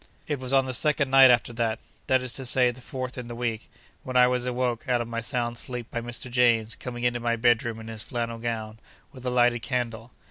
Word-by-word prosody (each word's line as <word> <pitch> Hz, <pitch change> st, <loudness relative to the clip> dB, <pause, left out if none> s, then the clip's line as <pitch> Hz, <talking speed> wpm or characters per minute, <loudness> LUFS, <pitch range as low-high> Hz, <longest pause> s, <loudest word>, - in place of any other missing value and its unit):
It 145 Hz, -3 st, -2 dB
was 130 Hz, 0 st, -4 dB
on 135 Hz, -1 st, +4 dB
the 130 Hz, -, -3 dB
second 145 Hz, +1 st, +2 dB
night 135 Hz, -1 st, +8 dB
after 120 Hz, -1 st, +3 dB
that—that 115 Hz, +3 st, -1 dB
is 125 Hz, -2 st, -3 dB
to 135 Hz, -, -4 dB
say, 125 Hz, 0 st, +4 dB
the 125 Hz, +1 st, -14 dB
fourth 130 Hz, 0 st, -5 dB
in 120 Hz, -, -7 dB
the 120 Hz, -, -7 dB
week—when 120 Hz, +2 st, -5 dB
I 125 Hz, -, +7 dB
was 125 Hz, 0 st, 0 dB
awoke 125 Hz, -1 st, -2 dB
out 125 Hz, -1 st, +3 dB
of 120 Hz, -, -3 dB
my 115 Hz, 0 st, -3 dB
sound 120 Hz, 0 st, -2 dB
sleep 125 Hz, -2 st, -6 dB
by 120 Hz, -, -3 dB
Mr. 120 Hz, +2 st, -4 dB
James 120 Hz, -3 st, +3 dB
coming 120 Hz, -1 st, -7 dB
into 120 Hz, 0 st, +1 dB
my 120 Hz, 0 st, 0 dB
bedroom 115 Hz, -1 st, +1 dB
in 110 Hz, -, -9 dB
his 110 Hz, -1 st, -6 dB
flannel 115 Hz, -1 st, -4 dB
gown, 110 Hz, -2 st, -4 dB, 0.3 s
with 130 Hz, -1 st, -8 dB
a -, -, +2 dB
lighted 120 Hz, -1 st, +3 dB
candle. 120 Hz, -3 st, -3 dB
120 Hz, 225 wpm, -26 LUFS, 115-125 Hz, 0.3 s, night